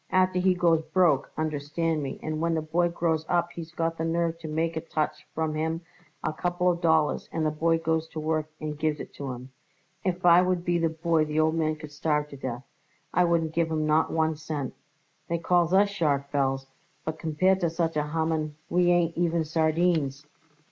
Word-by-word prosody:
Afterward 185 Hz, 0 st, +2 dB
he 185 Hz, -1 st, +4 dB
goes 170 Hz, -3 st, +3 dB
broke, 160 Hz, -8 st, +3 dB
understand 155 Hz, +1 st, -1 dB
me, 135 Hz, -2 st, -5 dB
and 155 Hz, 0 st, -3 dB
when 165 Hz, 0 st, +1 dB
the 160 Hz, -, 0 dB
boy 170 Hz, +3 st, +1 dB
grows 165 Hz, -2 st, 0 dB
up 175 Hz, -1 st, +1 dB
he's 165 Hz, -1 st, -8 dB
got 165 Hz, -1 st, -2 dB
the -, -, 0 dB
nerve 165 Hz, 0 st, 0 dB
to 160 Hz, -, -7 dB
make 160 Hz, +2 st, -1 dB
a 160 Hz, -, -2 dB
touch 155 Hz, -2 st, -3 dB
from 160 Hz, -1 st, -1 dB
him 160 Hz, +2 st, -1 dB, 0.4 s
a -, -, -1 dB
couple 175 Hz, +2 st, +1 dB
of 170 Hz, 0 st, -4 dB
dollars 160 Hz, -2 st, +2 dB
and 160 Hz, -1 st, -1 dB
the 155 Hz, -, +2 dB
boy 165 Hz, +2 st, +2 dB
goes 160 Hz, 0 st, 0 dB
to 160 Hz, -, -7 dB
work 155 Hz, 0 st, -1 dB
and 150 Hz, -1 st, -5 dB
gives 155 Hz, -1 st, 0 dB
it -, -, -8 dB
to 140 Hz, -2 st, -5 dB
him. 125 Hz, +1 st, -9 dB, 0.5 s
If 180 Hz, -1 st, -1 dB
I 175 Hz, 0 st, +8 dB
would 180 Hz, -1 st, 0 dB
be 175 Hz, 0 st, +2 dB
the 165 Hz, -1 st, +2 dB
boy 160 Hz, 0 st, +1 dB
the 150 Hz, +1 st, -1 dB
old 160 Hz, 0 st, +3 dB
man 155 Hz, -1 st, 0 dB
could 155 Hz, -1 st, -10 dB
starve 150 Hz, 0 st, 0 dB
to 140 Hz, -, -9 dB
death; 130 Hz, -2 st, -5 dB, 0.5 s
I 180 Hz, +1 st, +4 dB
wouldn't 165 Hz, -2 st, +1 dB
give 165 Hz, 0 st, +1 dB
him 155 Hz, -1 st, 0 dB
not 155 Hz, +1 st, +2 dB
one 160 Hz, 0 st, +1 dB
cent. 150 Hz, -4 st, -4 dB, 0.5 s
They 170 Hz, -, 0 dB
call 170 Hz, 0 st, +2 dB
us 200 Hz, +1 st, +5 dB
sharks, 140 Hz, -7 st, 0 dB
Belz, 135 Hz, -1 st, +1 dB, 0.4 s
but 160 Hz, 0 st, -4 dB
compared 185 Hz, +5 st, +2 dB
with 170 Hz, -2 st, 0 dB
such 165 Hz, -1 st, 0 dB
a 150 Hz, 0 st, 0 dB
Haman 160 Hz, -1 st, -1 dB, 0.2 s
we 175 Hz, 0 st, +3 dB
ain't 170 Hz, -1 st, +2 dB
even 170 Hz, -1 st, +1 dB
sardines." 155 Hz, -2 st, +1 dB
160 Hz, 210 wpm, -27 LUFS, 155-170 Hz, 0.5 s, I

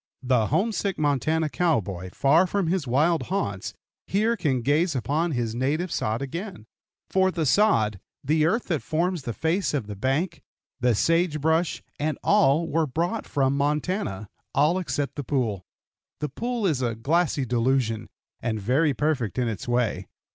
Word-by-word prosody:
The 125 Hz, -4 st, +2 dB
homesick 200 Hz, -, 0 dB
Montana 155 Hz, +2 st, +1 dB
cowboy, 105 Hz, -, -1 dB
far 155 Hz, -, +4 dB
from 200 Hz, +1 st, 0 dB
his 170 Hz, -3 st, -1 dB
wild 155 Hz, +7 st, +2 dB
haunts, 100 Hz, -, -2 dB, 0.3 s
can 195 Hz, -, 0 dB
here -, -, -1 dB
gaze 145 Hz, -, +1 dB
upon 150 Hz, +6 st, 0 dB
his 120 Hz, -3 st, -1 dB
native 150 Hz, +8 st, -1 dB
sod 110 Hz, +5 st, -1 dB
again; 170 Hz, -, -6 dB, 0.5 s
for 190 Hz, 0 st, +3 dB
the 165 Hz, -4 st, -1 dB
sod, 120 Hz, -, +3 dB, 0.2 s
the 155 Hz, +2 st, +2 dB
earth 225 Hz, +8 st, +1 dB
that 160 Hz, -5 st, 0 dB
forms 170 Hz, +2 st, -1 dB
the 120 Hz, -3 st, -4 dB
face 165 Hz, -, 0 dB
of 130 Hz, -7 st, -1 dB
the 105 Hz, 0 st, -7 dB
bank, 135 Hz, -, -1 dB, 0.4 s
the 125 Hz, -2 st, +2 dB
sage 165 Hz, -, +2 dB
brush, 160 Hz, +3 st, +1 dB, 0.2 s
and 150 Hz, +1 st, -1 dB
all 170 Hz, -6 st, +4 dB
were 160 Hz, 0 st, +1 dB
brought 170 Hz, -, -2 dB
from 135 Hz, -1 st, +1 dB
Montana 145 Hz, -, -1 dB, 0.3 s
all 155 Hz, +6 st, +3 dB
except 145 Hz, -6 st, -3 dB
the 145 Hz, -, -3 dB
pool. 115 Hz, -, -1 dB, 0.5 s
The 150 Hz, -, -2 dB
pool 235 Hz, -, -2 dB
is 150 Hz, -8 st, +1 dB
a 120 Hz, -2 st, -1 dB
glassy 145 Hz, +3 st, +1 dB
delusion, 120 Hz, -2 st, 0 dB, 0.3 s
and 110 Hz, -2 st, -2 dB
very 135 Hz, +8 st, +2 dB
perfect 140 Hz, -8 st, -1 dB
in 125 Hz, -2 st, +1 dB
its 110 Hz, -2 st, -4 dB
way. 120 Hz, -6 st, 0 dB
145 Hz, 160 wpm, -25 LUFS, 125-170 Hz, 0.5 s, far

